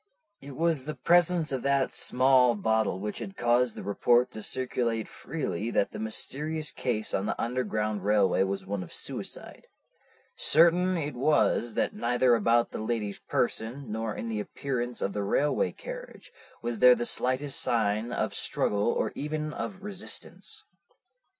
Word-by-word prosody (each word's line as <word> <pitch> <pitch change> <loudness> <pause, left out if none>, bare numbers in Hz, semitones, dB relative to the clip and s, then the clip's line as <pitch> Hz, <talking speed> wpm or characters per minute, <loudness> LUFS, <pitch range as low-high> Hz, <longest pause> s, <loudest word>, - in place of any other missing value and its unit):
"It 140 -1 -9
was 160 -4 0
the 155 0 -4
presence 175 -2 +3
of 130 -2 -2
that 140 0 +1
small 130 -1 +4
bottle 110 -2 +1
which 105 +1 -4
had 195 - -7
caused 120 0 +2
the - - -7
report 120 +4 +2
to 110 - -7
circulate 120 -2 -1
freely 120 - -4
that 100 - +1
the - - -7
mysterious 150 +8 -2
case 110 -4 -2
on 95 +2 0
the - - -2
Underground 110 -4 -1
Railway 105 -2 +3
was 95 0 -1
one 100 0 -3
of 90 - -9
suicide. - - -4 0.7
Certain 175 +3 +4
it 150 -2 -3
was 125 -3 +2
that - - 0
neither 125 +1 +2
about 115 +1 +3
the - - -5
lady's 110 -3 -2
person, 120 +2 -2
nor 110 0 -3
in 115 - -5
the 110 -2 -2
appearance 125 +1 -3
of 100 - -1
the 105 - -2
railway 140 +9 +1
carriage, - - -9 0.3
was 120 -2 -3
there 125 0 +8
the 120 - -2
slightest 130 +4 0
sign 110 0 0
of - - -1
struggle 105 0 0
or - - 0
even 150 +1 -3
of 190 0 -6
resistance. 205 -1 -5
120 Hz, 155 wpm, -28 LUFS, 110-145 Hz, 0.7 s, there